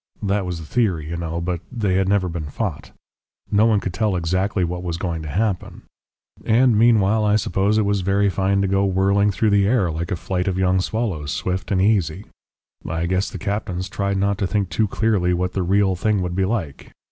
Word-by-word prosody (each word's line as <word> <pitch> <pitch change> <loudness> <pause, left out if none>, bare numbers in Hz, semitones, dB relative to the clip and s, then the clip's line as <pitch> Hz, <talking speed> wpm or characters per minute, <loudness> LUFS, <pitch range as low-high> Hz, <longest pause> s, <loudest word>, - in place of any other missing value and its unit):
That 100 -1 0
was 90 -2 -3
the 80 - -8
theory, 85 -7 -1
you - - -2
know, 85 0 -3
but 85 0 -2
they 105 -6 -1
had 95 0 +1
never 100 -2 +2
been 85 -3 -5
fought. 95 -2 -4 0.6
No 105 +2 +4
one 110 -3 +3
could 95 -2 -4
tell 105 +1 0
exactly 95 +3 0
what 90 +1 -3
was 85 -2 -3
going 85 -3 -3
to 80 - -7
happen. 100 +3 -2 0.6
And 120 +1 +3
meanwhile 110 -1 +4
I 105 0 +3
suppose 100 +1 +1
it 110 - +2
was 100 -1 +1
very 100 +2 +2
fine 100 0 +1
to - - +1
go 95 +1 +1
whirling 100 +2 +2
through 105 +2 +1
the 100 -1 +3
air 105 -7 +2
like 85 +3 -4
a 100 - -1
flight 90 +1 -3
of 95 -1 0
young 95 0 +2
swallows, 95 -10 -2
swift 90 +4 -3
and 95 - +1
easy. 95 -2 +1 0.6
I 80 +1 -2
guess 95 +3 0
the - - -7
captains 100 -3 -3
tried 100 0 -2
not 100 0 0
to 95 - 0
think 100 -2 -1
too 105 +7 +1
clearly 95 -5 +1
what 90 +1 -2
the 95 - -1
real 95 +1 +2
thing 100 +1 0
would 90 -1 -3
be 95 +1 +1
like. 95 -9 -4
95 Hz, 215 wpm, -21 LUFS, 90-105 Hz, 0.6 s, No